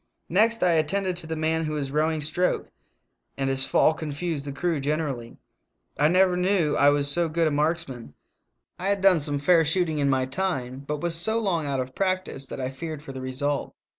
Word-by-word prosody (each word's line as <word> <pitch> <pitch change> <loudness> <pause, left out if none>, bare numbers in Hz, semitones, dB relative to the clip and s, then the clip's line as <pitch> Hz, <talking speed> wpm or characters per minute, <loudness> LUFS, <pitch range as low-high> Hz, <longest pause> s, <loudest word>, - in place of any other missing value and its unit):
Next 225 +6 +2
I 180 - +4
attended 180 +4 0
to 165 -2 -3
the 160 - -3
man 160 +1 0
who 155 - -3
was 140 -3 -3
rowing 155 +1 0
stroke, 180 +5 -1 0.7
and 135 -1 0
his 135 0 +2
fall 160 - +4
confused 155 -1 -4
the 140 - -4
crew 165 +2 -1
generally. 140 -5 -3 0.6
I - - +3
never 180 +2 +3
knew 180 -4 +1
I 140 - +5
was 145 0 +2
so 165 +3 +2
good 165 +1 +1
a - - 0
marksman; 145 - -2 0.6
I 190 +2 -1
had 200 -1 0
done 190 -4 +6
some 145 -1 +1
fair 165 +3 +4
shooting 160 -1 +1
in 140 -1 +2
my 130 -1 +1
time, 130 -4 -3
but 150 0 -3
was. 170 -1 0
so 195 +7 +2
long 180 -9 -1
out 135 -1 -1
of 130 0 -4
practice 185 -7 -2
that - - -7
I 130 0 -3
feared 155 +2 -7
for 140 - -8
the 130 - -7
result. 135 +2 -2
155 Hz, 205 wpm, -25 LUFS, 140-175 Hz, 0.7 s, done